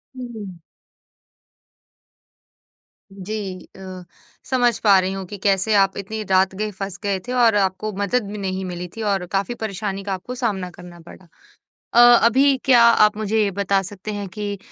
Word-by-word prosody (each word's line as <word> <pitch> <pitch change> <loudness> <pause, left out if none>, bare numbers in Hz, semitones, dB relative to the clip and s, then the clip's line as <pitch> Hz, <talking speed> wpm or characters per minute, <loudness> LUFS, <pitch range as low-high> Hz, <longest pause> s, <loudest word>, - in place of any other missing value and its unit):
हुँ। 220 -7 -8 2.6
जी, 195 -1 -6
अ, 185 -1 -9 0.5
समझ 245 -3 +2
पा 200 -3 +6
रही 185 0 -1
हूँ 195 -1 -5
कि 205 +3 -9
कैसे 200 +1 +2
आप 195 -1 +3
इतनी 215 +2 -5
रात 190 0 +3
गए 210 +2 -3
फँस 195 -1 -6
गए 200 -2 -1
थे - - -4
और 235 -3 +4
आपको 200 +2 0
मदद 210 +4 0
भी 210 - -6
नहीं 190 -1 -3
मिली 180 -1 -6
थी 225 - -6
और 190 -2 -1
काफ़ी 200 +5 -1
परेशानी 200 -2 -4
का 195 0 -3
आपको 190 +7 -6
सामना 205 -7 -2
करना 175 0 -13
पड़ा। 170 +2 -15 0.7
अ, 240 +1 +8
अभी 270 +4 +4
क्या 250 -3 +6
आप 215 -3 +5
मुझे 215 +1 0
ये 205 - +1
बता 200 0 0
सकते 200 +2 -7
हैं 205 -1 -5
कि 205 +2 -5
200 Hz, 165 wpm, -21 LUFS, 190-220 Hz, 2.6 s, अ